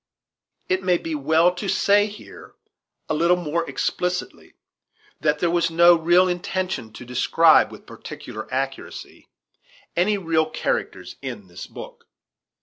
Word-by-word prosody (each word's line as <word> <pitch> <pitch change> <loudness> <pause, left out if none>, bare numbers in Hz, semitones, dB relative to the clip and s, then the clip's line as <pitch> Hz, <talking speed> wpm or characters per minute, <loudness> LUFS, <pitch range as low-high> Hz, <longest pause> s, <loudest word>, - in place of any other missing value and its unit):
It 185 +1 0
may 180 -2 +2
be 165 -1 -5
well 160 +4 +3
to 190 +3 -5
say 205 +1 +3
here, 210 0 -12 0.5
a - - -1
little 170 +3 +3
more 170 0 -2
explicitly, 180 0 -3 0.6
that 150 +1 +1
there 170 +2 0
was 170 -1 +1
no 170 +1 +6
real 175 +3 +4
intention 180 -8 -3
to 125 - -10
describe 125 0 +4
with - - -13
particular 110 0 -9
accuracy 135 +1 -5 0.7
any 205 +4 +2
real 165 -4 0
characters - - -3
in - - -6
this - - -9
book. 485 -1 -11
175 Hz, 135 wpm, -23 LUFS, 160-185 Hz, 0.7 s, no